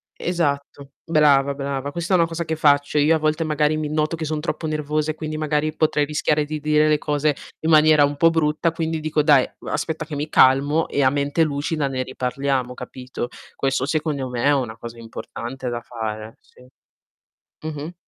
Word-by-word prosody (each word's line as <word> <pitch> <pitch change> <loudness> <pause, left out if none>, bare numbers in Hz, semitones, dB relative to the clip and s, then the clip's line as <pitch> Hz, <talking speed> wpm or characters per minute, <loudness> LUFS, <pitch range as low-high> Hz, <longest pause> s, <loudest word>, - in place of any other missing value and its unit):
esatto, 140 -5 -2
brava, 145 -3 +3
brava, 140 0 -4
questa 170 +4 -2
è - - +6
una 170 - +3
cosa 165 0 -4
che 160 - -2
faccio. 145 -1 +2
Io 150 +2 +4
a 160 - +2
volte 155 +1 0
magari 150 -1 +1
mi 155 -1 -2
noto 155 +1 0
che 160 - -5
son 155 0 -2
troppo 160 0 -3
nervosa 150 0 -1
e - - -9
quindi 155 -1 -5
magari 155 0 -1
potrei 155 -2 +2
rischiare 150 0 0
di 155 0 -5
dire 150 0 +3
le 155 0 +3
cose 150 0 0 0.3
in - - +2
maniera 155 -2 +6
un 145 +1 -2
po' 165 +3 +5
brutta 160 0 +1
quindi 160 -1 -3
dico: 155 0 +1
"Dai, 145 -4 +5
uhm, - - -12
aspetta 155 +2 -2
che 155 -1 -6
mi 145 +2 -3
calmo 145 +4 +4
e 140 - 0
a 130 - +5
mente 145 +3 +1
lucida 145 0 -1
ne 130 -1 -2
riparliamo," 130 0 -2
capito. 125 -1 -6 0.3
Questo, 135 -1 0
secondo 150 -3 -2
me, 120 -1 -3
è 145 - +5
una 125 -5 -2
cosa 115 0 -9
importante 120 +2 -7
da 120 -1 -3
fare, 110 -2 -6
sì. 125 - -21 1.0
Mh-mh. 155 +2 -6
150 Hz, 195 wpm, -22 LUFS, 140-155 Hz, 1.0 s, è